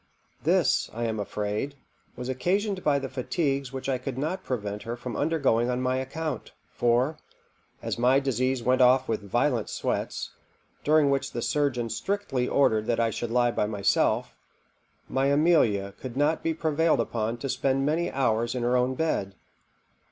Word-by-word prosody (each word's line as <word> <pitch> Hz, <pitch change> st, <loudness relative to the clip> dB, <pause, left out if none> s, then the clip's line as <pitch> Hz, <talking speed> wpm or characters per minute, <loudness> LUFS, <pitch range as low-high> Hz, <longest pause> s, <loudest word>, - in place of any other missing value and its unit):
This, -, -, +2 dB
I 115 Hz, +2 st, -3 dB
am 110 Hz, -1 st, -2 dB
afraid, 105 Hz, +7 st, -3 dB, 0.4 s
was 125 Hz, 0 st, -6 dB
occasioned 185 Hz, -, -1 dB
by 145 Hz, -2 st, +3 dB
the 135 Hz, -1 st, -3 dB
fatigues 135 Hz, 0 st, -2 dB
which 130 Hz, 0 st, -5 dB
I 130 Hz, -2 st, 0 dB
could 130 Hz, 0 st, -5 dB
not 160 Hz, +7 st, -2 dB
prevent 105 Hz, -4 st, -3 dB
her 120 Hz, +1 st, -5 dB
from 120 Hz, -2 st, -6 dB
undergoing 140 Hz, -7 st, +1 dB
on 125 Hz, 0 st, 0 dB
my 130 Hz, 0 st, 0 dB
account; 155 Hz, +4 st, -4 dB, 0.2 s
for, 125 Hz, +6 st, +1 dB, 0.6 s
as -, -, -3 dB
my 130 Hz, +3 st, +4 dB
disease 130 Hz, -1 st, 0 dB
went 130 Hz, +1 st, +3 dB
off 130 Hz, +1 st, +5 dB
with 110 Hz, -2 st, -1 dB
violent 120 Hz, +3 st, 0 dB
sweats, -, -, -3 dB, 0.5 s
during 150 Hz, -2 st, +4 dB
which 135 Hz, -1 st, -1 dB
the 120 Hz, -, -3 dB
surgeon 140 Hz, -5 st, 0 dB
strictly 135 Hz, -, -1 dB
ordered 110 Hz, -6 st, +2 dB
that 120 Hz, -, +1 dB
I 115 Hz, -1 st, +2 dB
should 120 Hz, +2 st, -4 dB
lie 120 Hz, 0 st, +2 dB
by 105 Hz, -, 0 dB
myself, 100 Hz, -2 st, +1 dB, 0.7 s
my 135 Hz, +1 st, +1 dB
Amelia 140 Hz, -, +3 dB
could 130 Hz, -1 st, -6 dB
not 150 Hz, +3 st, +2 dB
be 165 Hz, -1 st, -1 dB
prevailed 160 Hz, 0 st, +2 dB
upon 115 Hz, 0 st, -1 dB
to 135 Hz, -, -4 dB
spend 135 Hz, +1 st, 0 dB
many 160 Hz, +4 st, 0 dB
hours 120 Hz, -3 st, 0 dB
in 125 Hz, -, -2 dB
her 120 Hz, +1 st, +2 dB
own 125 Hz, +1 st, +1 dB
bed. 100 Hz, -11 st, -1 dB
130 Hz, 165 wpm, -27 LUFS, 120-145 Hz, 0.7 s, off